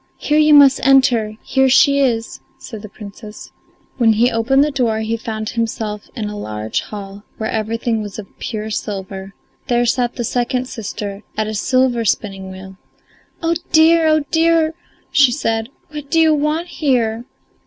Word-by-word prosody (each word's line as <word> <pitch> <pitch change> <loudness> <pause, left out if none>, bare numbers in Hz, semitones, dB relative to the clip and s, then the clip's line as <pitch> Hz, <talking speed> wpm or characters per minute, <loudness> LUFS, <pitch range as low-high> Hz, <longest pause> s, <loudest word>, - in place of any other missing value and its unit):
"Here 300 +1 +1
you 305 -1 +6
must 275 -2 +7
enter: 245 -5 +3
here 265 0 +2
she 280 +2 +5
is," 230 -4 0 0.2
said 220 -5 -9
the 215 - -10
Princess. 210 +1 -11 0.5
When 225 -2 +5
he 240 +4 +2
opened 240 +5 +3
the 300 - 0
door 230 -5 0
he 220 +1 -1
found 220 -1 -5
himself 220 -3 -3
in 220 -4 -3
a 210 - -6
large 110 - -3
hall, 200 -1 -9
where 220 - -3
everything 225 +1 -1
was 205 -2 -7
of 215 - -6
pure 220 -1 -4
silver; 195 -2 -5 0.3
there 240 0 +2
sat 240 0 0
the 240 - -3
second 250 +2 -1
sister 205 -3 -6 0.2
at 215 - 0
a 215 - -4
silver 255 +2 +1
spinning 195 -3 -2
wheel. 190 0 -10 0.7
"Oh, 330 0 +2 0.2
dear; 320 +1 +5
oh, 310 0 +3
dear!" 325 -1 +3 0.4
she 275 -3 +5
said. 225 -3 -1 0.2
"What 295 -2 -8
do 330 - +2
you 320 -1 +5
want 305 +4 -1
here?" 240 -7 0
230 Hz, 165 wpm, -18 LUFS, 215-275 Hz, 0.7 s, must